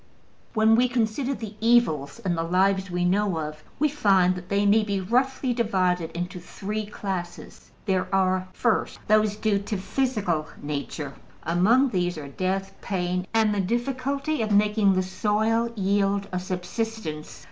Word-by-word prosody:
When 220 0 +5
we 250 +2 +4
consider 245 +3 0
the 220 -3 -7
evils 225 -12 +2
in 180 - +1
the 165 - -1
lives 190 +3 +1
we 180 0 -1
know 195 0 +1
of, 155 0 -5
we 300 - +3
find 195 -11 +3
that 180 0 -9
they 200 +1 +2
may 210 +2 +5
be 200 -2 -1
roughly 250 +6 +1
divided 185 -7 +1
into 180 +1 -4
three 210 +4 -5
classes. 185 -4 -6 0.2
There 190 -2 +1
are, 185 -1 +1
first, 235 +4 0
those 215 -1 +3
due 210 -1 +1
to 205 +1 -3
physical 195 - -1
nature: 145 0 -4 0.3
among 215 - +3
these 180 -4 -1
are 145 -2 -6
death, 190 +6 -2
pain 180 -1 -2
and 220 -2 +3
the 205 - +1
difficulty 265 +6 -1
of 215 - -1
making 210 -1 +4
the 185 0 +1
soil 220 +4 0
yield 200 0 +1
a 180 - -1
subsistence. 180 -3 -4
200 Hz, 155 wpm, -25 LUFS, 180-225 Hz, 0.3 s, When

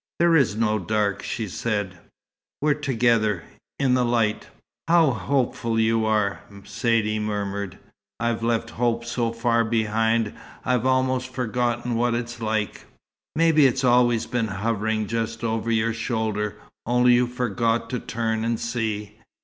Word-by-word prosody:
"There 170 -1 +4
is 135 -9 +3
no 110 -1 +1
dark," 100 +1 0
she 110 -3 -3
said. 100 -2 -3 0.6
"We're 150 0 +3
together 115 - +1 0.3
in 135 -2 +2
the 125 -1 +3
light." 115 -3 0 0.4
"How 165 -4 +5
hopeful 115 0 -1
you 110 0 +2
are!" 105 -2 +1 0.2
Saidee 110 0 0
murmured. 100 -2 -3 0.4
"I've 115 -1 -1
left 115 0 0
hope 120 0 0
so 120 -1 -1
far 115 0 +1
behind, 110 0 +1 0.3
I've 125 0 +1
almost 130 0 +1
forgotten 120 -1 -1
what 120 +1 +1
it's 120 0 -5
like." 110 -1 -2 0.5
"Maybe 155 -3 +5
it's 130 +1 -1
always 120 -2 +4
been 125 -3 -1
hovering 110 +1 -1
just 115 +1 -3
over 115 0 -1
your 115 0 +1
shoulder, 110 -2 -2 0.3
only 125 +1 +4
you 120 0 +3
forgot 120 -1 -1
to 125 - -1
turn 110 -1 -2
and 115 0 -1
see. 110 -3 -3
115 Hz, 140 wpm, -24 LUFS, 110-125 Hz, 0.6 s, How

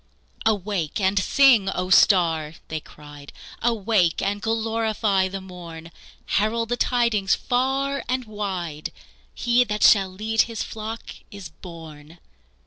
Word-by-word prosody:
"Awake 200 -5 -1
and 195 0 +2
sing, 240 -2 +4
O 185 -1 -3
star!" 165 -6 +4 0.2
they 155 - -3
cried. 145 -1 -13 0.3
"Awake 215 -6 +1
and 205 +1 -2
glorify 220 -3 0
the 195 +1 -6
morn! 170 -3 -10 0.3
Herald 225 +3 0
the 245 - +1
tidings 235 -6 +1
far 270 +2 -1
and 255 0 -1
wide 185 -8 -5 0.4
He 240 +1 +3
that 210 -3 -3
shall 195 -2 +6
lead 220 +4 0
His 225 -2 -3
flock 225 +1 -7 0.2
is 200 -5 -9
born!" 160 -1 -12
200 Hz, 125 wpm, -23 LUFS, 175-225 Hz, 0.4 s, shall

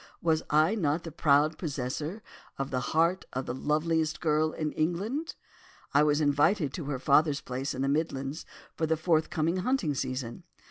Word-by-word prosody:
Was 160 -1 +1
I 155 +6 +4
not 160 -6 0
the 165 - -7
proud 150 0 +3
possessor 150 - -4 0.3
of 135 +1 -3
the 130 - 0
heart 165 +8 +1
of 130 +1 -3
the 120 - -3
loveliest 155 +3 0
girl 155 -1 +1
in 155 -1 -3
England? 205 - -2 0.6
I 140 - +5
was 150 0 +3
invited 145 +1 +2
to 165 - -5
her 140 -1 -2
father's 145 +2 +3
place 130 +2 -4
in 130 - -2
the - - +1
Midlands, 140 0 -1 0.3
for 160 - -1
the 160 0 +1
forthcoming 160 +1 +1
hunting 190 - 0
season. 130 0 -4
155 Hz, 170 wpm, -29 LUFS, 140-165 Hz, 0.6 s, I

